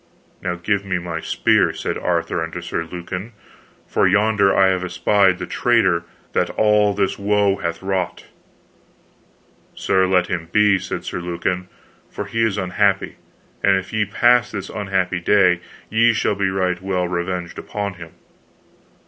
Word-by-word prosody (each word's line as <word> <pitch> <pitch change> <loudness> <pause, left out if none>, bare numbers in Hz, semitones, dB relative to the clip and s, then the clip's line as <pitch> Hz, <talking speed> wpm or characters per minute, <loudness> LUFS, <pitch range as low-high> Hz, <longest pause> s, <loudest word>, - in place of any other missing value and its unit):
Now 90 -1 -2
give 100 +3 -1
me 95 -2 -1
my 85 -2 -4
spear, - - +2
said - - -3
Arthur 85 -1 -1
unto 80 +2 -5
Sir 85 -1 -4
Lucan, 90 +5 -7 0.5
for - - +2
yonder 100 -2 +3
I 95 -1 +4
have 95 -1 0
espied 95 0 +2
the - - -5
traitor 95 -9 +2 0.3
that - - +1
all 105 -1 +2
this 100 0 -1
woe 100 -1 +2
hath 85 +1 -4
wrought. 95 -1 -2 1.5
Sir, 95 0 +2
let 90 -1 +3
him 85 -3 -4
be, 105 -1 +4
said 95 - -5
Sir - - -4
Lucan, 90 +1 -3 0.4
for 100 - -5
he 115 +3 -2
is 110 -3 +1
unhappy; 95 +1 0 0.4
and 100 -1 +4
if 95 +2 -6
ye 110 -1 +1
pass 120 +2 +3
this 100 -3 -6
unhappy 95 -3 -1
day, 90 -1 +3 0.3
ye 115 +2 +4
shall 105 - +1
be 100 -1 0
right 90 -1 -1
well 95 -2 -1
revenged 90 0 -3
upon 100 -2 -4
him. 85 -3 -12
95 Hz, 155 wpm, -20 LUFS, 90-105 Hz, 1.5 s, I